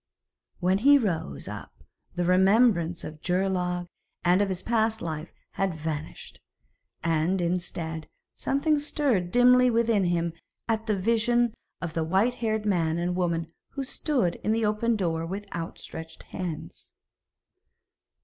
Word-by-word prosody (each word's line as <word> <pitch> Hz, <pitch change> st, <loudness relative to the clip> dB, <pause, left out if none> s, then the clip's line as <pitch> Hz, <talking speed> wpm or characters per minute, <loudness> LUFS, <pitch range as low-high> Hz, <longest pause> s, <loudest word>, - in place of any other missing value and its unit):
When 185 Hz, +2 st, +2 dB
he 285 Hz, +5 st, +7 dB
rose 160 Hz, -, -2 dB
up -, -, -9 dB, 0.3 s
the 175 Hz, -1 st, 0 dB
remembrance 185 Hz, -2 st, +4 dB
of 155 Hz, 0 st, -8 dB
Geirlaug 180 Hz, -1 st, 0 dB, 0.4 s
and 180 Hz, +3 st, +5 dB
of 200 Hz, -, +1 dB
his 185 Hz, -1 st, -3 dB
past 220 Hz, -1 st, +1 dB
life 155 Hz, 0 st, -5 dB, 0.2 s
had 195 Hz, -3 st, -1 dB
vanished, 155 Hz, 0 st, -6 dB, 0.6 s
and, 165 Hz, +3 st, +1 dB
instead, 170 Hz, -2 st, -2 dB, 0.3 s
something 295 Hz, +2 st, +1 dB
stirred 275 Hz, -, 0 dB
dimly 250 Hz, +1 st, +6 dB
within 230 Hz, -4 st, +2 dB
him 170 Hz, -1 st, 0 dB, 0.3 s
at 225 Hz, 0 st, -1 dB
the 210 Hz, -2 st, +1 dB
vision 230 Hz, +3 st, +2 dB, 0.3 s
of 170 Hz, -3 st, -4 dB
the 165 Hz, -, 0 dB
white 190 Hz, +9 st, +2 dB
haired 220 Hz, -2 st, 0 dB
man 170 Hz, -5 st, +1 dB
and 175 Hz, +1 st, -1 dB
woman 170 Hz, -2 st, -1 dB, 0.2 s
who 275 Hz, -, -3 dB
stood 255 Hz, -, 0 dB
in 215 Hz, -, +2 dB
the 225 Hz, 0 st, +1 dB
open 215 Hz, +2 st, +1 dB
door 165 Hz, -5 st, -1 dB
with 195 Hz, +5 st, -5 dB
outstretched 165 Hz, -1 st, -7 dB
hands. 175 Hz, -5 st, -6 dB
185 Hz, 135 wpm, -27 LUFS, 170-225 Hz, 0.6 s, he